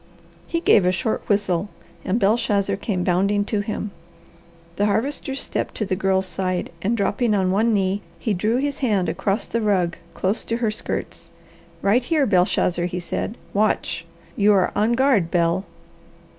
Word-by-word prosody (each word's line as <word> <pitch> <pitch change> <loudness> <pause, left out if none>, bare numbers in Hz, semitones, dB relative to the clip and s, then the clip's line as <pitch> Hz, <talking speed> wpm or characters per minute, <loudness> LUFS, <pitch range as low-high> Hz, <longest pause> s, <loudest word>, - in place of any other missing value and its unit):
He 335 -1 -1
gave 205 - +5
a - - +4
short 220 +5 -1
whistle 200 -2 +1 0.3
and 200 +6 0
Belshazzar 200 -2 +2
came 195 -3 -2
bounding 200 +3 +2
to 210 0 -1
him. 210 0 -3 0.9
The 205 - +2
Harvester 265 +6 -1
stepped - - -3
to 215 - -1
the 190 -1 -1
Girl's 190 0 +1
side, 185 -1 -2
and 225 +6 0
dropping 210 +2 +1
on 190 -2 +1
one 220 +4 +2
knee, 195 -1 +1 0.2
he 220 - -1
drew 215 +6 +1
his 285 +1 -2
hand 210 -9 +1
across 200 +3 -1
the 230 - -2
rug 185 -5 +1 0.2
close 195 +4 0
to 230 - -1
her 230 -3 0
skirts. 215 - -5 0.5
"Right 220 +6 +3
here, 295 +2 +2
Belshazzar," 180 -3 +2
he 180 0 -3
said. 205 +5 -4 0.2
"Watch! 210 -4 0 0.3
You 205 0 +4
are 190 -2 +3
on 215 +3 +2
guard, 235 -9 +3
Bel." 170 +2 +1
205 Hz, 165 wpm, -22 LUFS, 185-225 Hz, 0.9 s, gave